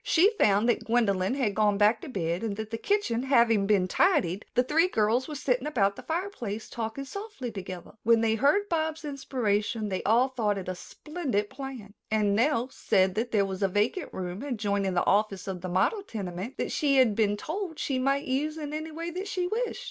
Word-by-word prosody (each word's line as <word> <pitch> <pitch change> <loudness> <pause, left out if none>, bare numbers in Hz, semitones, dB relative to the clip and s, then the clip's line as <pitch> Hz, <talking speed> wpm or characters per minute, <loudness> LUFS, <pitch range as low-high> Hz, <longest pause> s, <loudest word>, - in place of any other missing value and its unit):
She 370 +6 +4
found 205 +2 +4
that 240 - +1
Gwendolyn 210 -3 +1
had 245 -7 0
gone 210 -1 +2
back 210 +2 +4
to - - -8
bed 170 -6 -2
and 220 -3 -2
that 220 +1 -6
the 225 - -2
kitchen 405 - 0
having 235 -6 +3
been 200 -3 +3
tidied, 220 - +2
the 250 - +4
three 320 +7 +3
girls 225 - +1
were 305 - -6
sitting 260 0 0
about 200 -9 +1
the - - -9
fireplace 320 - -4
talking 230 +4 -4
softly 400 - -6
together. 185 -3 -7
When 230 0 +4
they 225 -1 +2
heard 285 - +2
Bobs' 320 -3 -1
inspiration, 225 -6 -1
they 185 - -2
all 240 +5 +3
thought 220 -6 0
it 190 - -6
a 185 - -2
splendid 250 - -4
plan, 260 -6 -8 0.2
and 210 -2 +2
Nell 250 +1 +2
said 190 -7 +2
that 225 +4 -2
there 205 -3 +3
was 190 0 -5
a 195 - +3
vacant 210 - -1
room 180 +2 -5
adjoining 200 -8 -1
the 175 - +2
office 200 -2 +1
of 185 -2 -4
the 185 - -4
model 190 - +1
tenement 200 - -6
that - - -2
she 285 -2 +2
had 250 -5 +5
been 210 -1 +2
told 325 - -4
she 265 -2 -1
might 275 +2 +1
use 295 +4 -1
in 300 -1 -5
any 310 +1 -4
way 330 +2 -5
that 370 +4 -5
she 370 -2 -1
wished. 455 +7 -2
230 Hz, 210 wpm, -28 LUFS, 205-290 Hz, 0.2 s, had